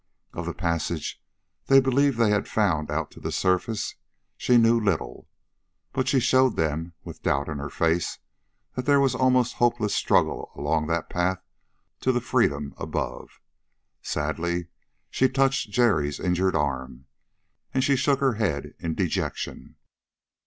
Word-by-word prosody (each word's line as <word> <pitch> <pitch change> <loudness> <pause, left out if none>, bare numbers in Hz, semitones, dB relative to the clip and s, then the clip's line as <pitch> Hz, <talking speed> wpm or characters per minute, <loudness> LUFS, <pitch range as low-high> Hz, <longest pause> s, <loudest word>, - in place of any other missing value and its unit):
Of - - -5
the - - -4
passage 85 -1 -2 0.5
they 135 0 +7
believed 135 0 +2
they 115 -3 +3
had 105 - +1
found 85 -9 0
out 75 0 -2
to - - -13
the - - -4
surface, 95 +4 0 0.4
she 125 - +3
knew 115 0 +5
little. 100 -7 -2 0.6
But 130 -1 -1
she 135 - +3
showed 130 0 +3
them, 80 +2 -1
with - - -10
doubt 70 +1 0
in 75 -2 -4
her 70 +1 -5
face, 85 +3 0 0.6
that 125 - -4
there 140 -1 +5
was 135 -2 +3
almost 130 -1 +2
hopeless 120 -3 +1
struggle - - +1
along 80 -1 0
that 85 0 -1
path 90 +1 -1 0.6
to 130 - +2
the 125 - +1
freedom 75 - 0
above. - - -5 0.6
Sadly 85 +3 -2 0.4
she 130 - +3
touched 135 -3 +1
Jerry's 100 - +2
injured 90 +1 +1
arm, 65 -3 -2 0.7
and 130 - +1
she 140 - +3
shook 140 +1 +1
her 135 -2 +3
head 95 -10 -2
in 85 -2 -3
dejection. - - -3
100 Hz, 145 wpm, -25 LUFS, 80-130 Hz, 0.7 s, they